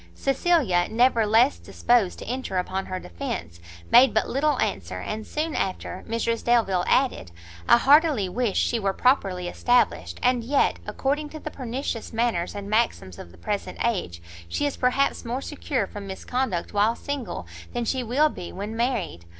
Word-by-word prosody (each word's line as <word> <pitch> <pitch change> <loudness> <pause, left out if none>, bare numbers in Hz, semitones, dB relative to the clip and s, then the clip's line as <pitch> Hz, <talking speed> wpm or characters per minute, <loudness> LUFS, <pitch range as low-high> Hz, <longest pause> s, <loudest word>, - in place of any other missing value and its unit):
Cecilia, 270 - +2
never 230 -1 +3
less 230 +6 +4
disposed 235 -7 +1
to - - -8
enter 250 -6 -3
upon 190 +1 -2
her 185 0 -4
defence, 85 - -6 0.3
made 255 0 +7
but - - +2
little 290 +1 +1
answer; 90 -1 -2
and, 215 - -5
soon 310 +1 -2
after, 185 -1 -3
Mrs 230 0 -1
Delvile 220 -7 +2
added, 255 - +1 0.4
"I - - +8
heartily 285 - +4
wish 225 +2 -1
she 235 - +1
were 195 -2 0
properly 190 -8 +1
established; 245 +7 +1
and 250 -1 +2
yet, 275 +4 +1
according 295 +2 -1
to 310 - -8
the 305 - -6
pernicious 250 -2 -4
manners 225 -7 0
and 200 -1 -6
maxims 210 - 0
of 85 - -10
the 90 - -17
present 205 -2 -4
age, 90 - -2 0.3
she 290 - -1
is 285 - -1
perhaps 260 +2 +1
more 245 +2 -3
secure 275 -5 -2
from 200 +1 -9
misconduct 195 -1 -3
while 210 +3 +3
single, 270 - -5 0.3
than 240 - -2
she 260 +3 0
will 260 +6 +2
be 175 - -8
when 205 +3 -6
married. 230 - -2
230 Hz, 165 wpm, -25 LUFS, 190-260 Hz, 0.4 s, I